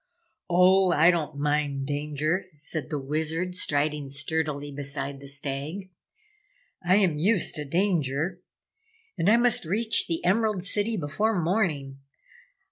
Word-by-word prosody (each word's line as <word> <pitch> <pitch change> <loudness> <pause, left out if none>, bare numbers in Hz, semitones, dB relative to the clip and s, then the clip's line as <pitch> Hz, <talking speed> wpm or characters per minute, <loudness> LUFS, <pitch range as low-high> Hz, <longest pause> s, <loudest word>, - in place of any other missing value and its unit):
"Oh, 185 +1 +5
I 165 +3 +6
don't 155 -4 -3
mind 145 -1 0
danger," 150 +5 -1
said 150 -1 -4
the 150 - -2
Wizard, 160 +6 -2
striding 150 -4 0
sturdily 145 0 -2
beside 140 0 -4
the 140 - -11
Stag. 140 +7 -5 0.9
"I 180 +2 +4
am 185 -7 +2
used 195 +3 +2
to 150 - -4
danger 170 0 0 0.7
and 175 - +1
I 225 - +6
must 240 -1 +3
reach 220 +7 +1
the 165 0 -3
Emerald 210 0 +1
City 210 +3 -1
before 195 +7 0
morning! 160 -7 -1
160 Hz, 125 wpm, -26 LUFS, 145-185 Hz, 0.9 s, I